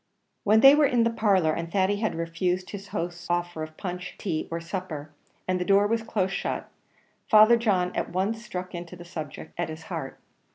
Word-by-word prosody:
When 215 +1 +5
they 270 +1 +10
were 295 -1 +5
in 245 -3 +3
the 230 - +2
parlour, 195 -8 +2
and 170 +1 -4
Thady 195 +1 +2
had 220 -3 -1
refused 175 +2 -2
his 200 -1 -7
host's 175 -1 -5
offers 175 -2 -2
of 155 - -27
punch, 180 -1 -5
tea, 165 -7 -2
or 165 - -3
supper, 165 -4 -5 0.4
and 185 0 +1
the - - 0
door 200 +2 +4
was 225 +2 +1
close 200 -4 -1
shut, - - -3 0.6
Father 215 +2 +8
John 190 -6 +1
at - - -1
once 205 +5 -1
struck 185 -3 -6
into 175 0 -7
the 175 0 -11
subject 160 -5 -7
at 175 - -1
his 160 0 -8
heart. 145 -5 -5
180 Hz, 200 wpm, -26 LUFS, 170-205 Hz, 0.6 s, they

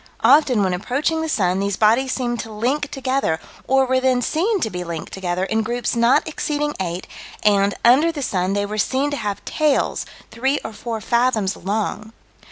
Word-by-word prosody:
Often, 260 -8 +5
when 185 -1 +1
approaching 280 - -1
the 320 - -2
sun, 185 - +1
these 200 0 -1
bodies 235 +5 +3
seemed 240 -2 -2
to 225 - -6
link 260 +7 -1
together, 260 -11 -1 0.3
or 270 0 +4
were 260 0 +2
then 255 -1 +2
seen 390 - +1
to 220 - -1
be 180 0 -4
linked 170 -2 -6
together, 180 -1 -2
in 220 +3 0
groups 240 +1 -2
not 235 +6 +3
exceeding 295 -1 -2
eight, 180 -1 -3 0.4
and, 200 -1 +3
under 280 +8 +5
the 295 -4 -5
sun, 185 -4 0
they 205 0 0
were 210 +1 -4
seen 270 +6 0
to 285 - -2
have 205 -4 -4
tails 305 -3 0 0.2
three 265 +4 0
or 220 - -5
four 225 0 -5
fathoms 235 -5 +1
long. 210 +2 -3
235 Hz, 185 wpm, -21 LUFS, 200-270 Hz, 0.4 s, Often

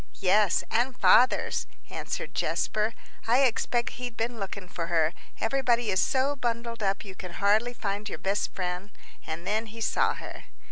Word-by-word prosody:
"Yes, 200 0 +4
and 245 +2 +1
father's," 255 - +4 0.2
answered - - -4
Jasper. 215 +1 0 0.3
"I 245 +4 +5
expect 240 -1 +1
he'd 245 -2 -5
been 230 0 -2
looking 195 -1 -5
for 170 -2 -4
her; 165 -1 +2 0.3
everybody 240 -2 +1
is 190 - +3
so 275 +1 +2
bundled 235 -2 -3
up 200 +1 0
you 195 - -8
can 180 -1 -8
hardly 210 +6 +3
find 205 -1 -3
your - - -5
best 195 +2 -1
friend. 180 +1 -3 0.4
And 160 +2 -5
then 220 +2 0
he 225 +2 -10
saw 220 - +2
her." - - -9
215 Hz, 160 wpm, -28 LUFS, 195-240 Hz, 0.4 s, I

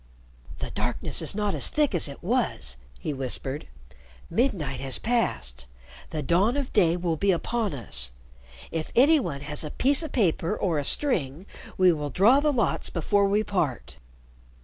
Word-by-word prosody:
"The - - -5
darkness - - -2
is - - 0
not 210 -1 -1
as - - +4
thick 300 -6 +1
as 175 - +4
it 140 +3 -10
was," 225 - -1 0.2
he 155 - -3
whispered. 135 - -3 0.6
"Midnight 170 - 0
has 135 -1 +5
passed. 65 - -1 0.4
The 155 -2 -4
dawn 195 - +2
of 275 -3 -4
day 175 -5 +3
will 170 -2 -1
be 200 +5 0
upon 205 +1 0
us. 65 - -2 0.6
If 160 -1 -4
any 295 +6 +6
one 140 - -4
has 150 +2 0
a 150 - -4
piece 275 - +2
of 315 -3 -4
paper 190 -3 0
or 170 -6 0
a - - -2
string, 170 - -1 0.3
we 185 -1 +5
will 150 -3 -3
draw 215 - +4
the 300 +1 +2
lots 245 -5 0
before 200 +4 +1
we 205 +2 +1
part." 165 - -3
175 Hz, 170 wpm, -26 LUFS, 145-230 Hz, 0.6 s, any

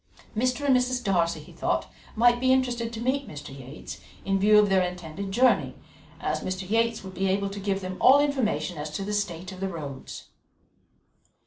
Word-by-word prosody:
Mr. 255 +5 0
and 270 -2 +5
Mrs. 250 0 +1
Darcy, 175 -5 +1
he - - -13
thought, - - -1 0.3
might 240 +1 +4
be 260 +1 +3
interested 245 -3 +1
to 225 - -6
meet 260 +3 0
Mr. 145 -2 -9
Yates, 135 +2 -9 0.3
in 195 0 +1
view 210 +2 +6
of 210 0 +6
their 190 -1 +3
intended 180 +1 -4
journey, 250 +5 +3 0.4
as - - -1
Mr. 185 0 -4
Yates 230 +2 +1
would 190 -1 -8
be 190 +2 -1
able 195 +1 0
to 200 - -6
give 195 0 -1
them 185 0 -5
all 270 +2 +8
information 255 - 0
as 150 +1 -4
to 150 +6 -4
the 210 - -3
state 185 -3 -2
of 185 - -10
the 195 0 -2
roads. 145 -6 -7
200 Hz, 195 wpm, -26 LUFS, 185-240 Hz, 0.4 s, all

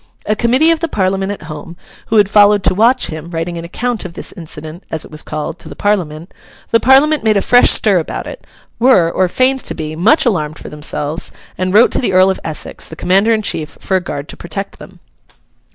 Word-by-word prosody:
A 215 - 0
committee 255 +9 +3
of 330 - +1
the 330 - -1
Parliament 195 -5 -1
at 205 - -7
home, 155 +2 -9 0.3
who 225 - -1
had 205 -2 +5
followed 205 0 +4
to - - +2
watch 230 +7 +3
him, 160 0 -7
writing 170 +1 -4
an - - -7
account 235 +6 -3
of 180 -2 -9
this - - -4
Incident, 160 +1 -9
as 160 -1 -4
it - - -15
was 155 0 -3
called, 155 +2 -5
to - - -11
the - - -9
Parliament, 175 -5 -2 0.4
the 230 - +4
Parliament 280 +5 +4
made 215 -2 +3
a - - +2
fresh 245 0 +5
stir 200 -4 +4
about 160 - -5
it; - - -9 0.4
were, 210 -9 +4
or 185 +1 +1
feigned 260 +7 +1
to - - -5
be, 155 -1 -5
much 215 - +3
alarmed 155 -9 -1
for - - -9
themselves; 150 +1 -3 0.2
and 185 0 -2
wrote 215 +5 +5
to - - +1
the 215 -7 -1
Earl 185 +1 +5
of 190 - -4
Essex, 155 -1 -4
the 160 - -10
commander 195 +7 +2
in 220 -1 +1
chief, 155 -6 -3
for 190 - -1
a 185 - +2
guard 145 -4 -6
to - - -8
protect 195 +4 -6
them. - - -13
185 Hz, 230 wpm, -15 LUFS, 160-220 Hz, 0.4 s, had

